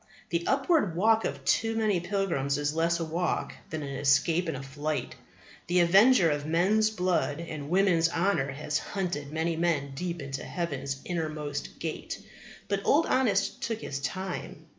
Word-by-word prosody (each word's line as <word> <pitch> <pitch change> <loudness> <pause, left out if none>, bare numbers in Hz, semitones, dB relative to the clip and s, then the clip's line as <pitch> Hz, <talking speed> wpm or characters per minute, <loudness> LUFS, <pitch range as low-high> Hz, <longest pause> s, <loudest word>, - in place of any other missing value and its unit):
The 170 -1 0
upward 270 - +2
walk 220 +5 +3
of - - -4
too 225 0 +2
many 215 -5 +2
pilgrims 175 -7 -1
is 145 0 -1
less 165 +1 +1
a 165 - -1
walk 170 +3 -1 0.2
than 155 -1 -4
an 140 - -5
escape 155 +6 +2
and 160 - -2
a 130 - -7
flight. 145 +3 -3 0.5
The 180 +1 +3
avenger 190 +1 +6
of 145 0 -1
men's 190 +8 +3
blood 180 -7 0
and 155 -4 -6
women's 175 -3 +3
honour 165 -5 +1
has 150 +2 -2
hunted 175 -8 -3
many 160 +1 -1
men 160 -4 0
deep 175 +4 -4
into 135 -1 -5
heaven's 140 -6 -3
innermost 155 -4 -4
gate. - - -5 0.5
But 200 -1 -1
Old 320 +3 +4
Honest 205 -7 +1
took 225 -1 -3
his 140 - -4
time. 185 +6 -5
170 Hz, 160 wpm, -28 LUFS, 145-195 Hz, 0.5 s, avenger